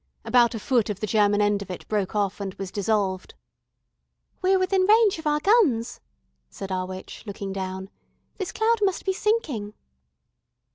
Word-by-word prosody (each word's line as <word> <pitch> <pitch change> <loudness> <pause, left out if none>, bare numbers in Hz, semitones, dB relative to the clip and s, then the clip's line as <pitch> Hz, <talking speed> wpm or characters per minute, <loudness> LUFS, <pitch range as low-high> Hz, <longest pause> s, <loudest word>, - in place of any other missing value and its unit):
About 240 -1 +4
a - - -4
foot 235 -1 +1
of 205 -2 -3
the 215 - -2
German 210 -1 +3
end 205 -1 +2
of 200 - -8
it 180 - -7
broke 205 -2 -1
off 205 -1 -1
and 195 -2 -5
was 195 -2 -6
dissolved. 200 -2 -1 1.1
"We're 380 +1 +3
within 375 +1 +2
range 430 -4 +5
of 320 - -4
our 300 0 +2
guns," 300 - +2 0.5
said 195 - -7
our 185 0 -2
witch, 185 0 -9
looking 200 -1 -5
down. 190 0 -5 0.5
"This 380 - -3
cloud 455 +1 +2
must 385 -3 0
be 380 - +1
sinking." 360 - -1
215 Hz, 170 wpm, -25 LUFS, -, 1.1 s, range